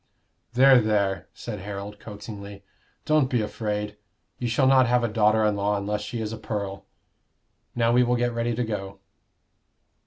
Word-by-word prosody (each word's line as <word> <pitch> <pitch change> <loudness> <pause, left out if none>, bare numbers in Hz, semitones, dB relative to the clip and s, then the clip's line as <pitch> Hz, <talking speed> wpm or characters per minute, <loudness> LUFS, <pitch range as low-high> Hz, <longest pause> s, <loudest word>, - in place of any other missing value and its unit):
"There, 130 0 +7
there!" 100 -4 0
said 105 -4 -7
Harold, 100 +1 -7
coaxingly. 100 -1 -9 0.4
"Don't 155 -4 +3
be 125 - +1
afraid. 105 -1 -3 0.4
You 120 - -2
shall 120 +4 +2
not 130 -1 +5
have 120 0 +2
a - - +2
daughter 110 0 +3
in 105 -1 +2
law 100 +1 0
unless 105 +1 -2
she 115 +3 -5
is 110 0 -3
a 110 - -7
pearl. 100 -4 -4 0.9
Now 115 -1 +2
we 125 +1 +5
will 125 0 +2
get 120 0 0
ready 115 0 -1
to 125 - 0
go." 100 -3 -5
110 Hz, 165 wpm, -25 LUFS, 105-120 Hz, 0.9 s, There